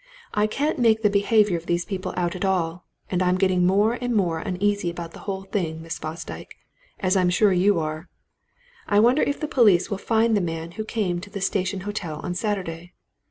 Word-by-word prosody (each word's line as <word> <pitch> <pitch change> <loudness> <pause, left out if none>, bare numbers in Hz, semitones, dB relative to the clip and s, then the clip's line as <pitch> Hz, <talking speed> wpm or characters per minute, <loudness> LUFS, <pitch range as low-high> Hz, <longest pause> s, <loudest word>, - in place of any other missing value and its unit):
I 210 0 +2
can't 285 +7 -1
make 225 -2 +3
the 210 - +4
behaviour 205 -1 +3
of 165 - -10
these 175 0 0
people 185 -2 -4
out 175 -1 0
at 185 - -4
all 180 -3 -1 0.3
and 180 -1 +1
I'm 180 0 +2
getting 185 -2 +2
more 210 +6 +2
and 245 -1 -1
more 175 -6 +1
uneasy 200 +1 -1
about 170 -1 -6
the - - -12
whole 195 0 -3
thing, 165 -5 -3
Miss 165 0 -5
Fosdyke 160 +2 -7 0.4
as 185 0 +1
I'm 185 -2 +3
sure 195 +2 +3
you 190 +2 +3
are. 155 +2 -4 0.8
I 205 - +3
wonder 245 +7 +4
if 285 - 0
the 305 - -2
police 215 - +4
will 200 - -2
find 225 +1 +2
the 205 - +2
man 165 -1 -4
who 215 +5 -5
came 190 -6 -1
to 205 - -10
the 200 0 -6
Station 190 0 -1
Hotel 185 -6 -4
on 180 - -3
Saturday? 180 -4 -3
190 Hz, 205 wpm, -24 LUFS, 175-210 Hz, 0.8 s, the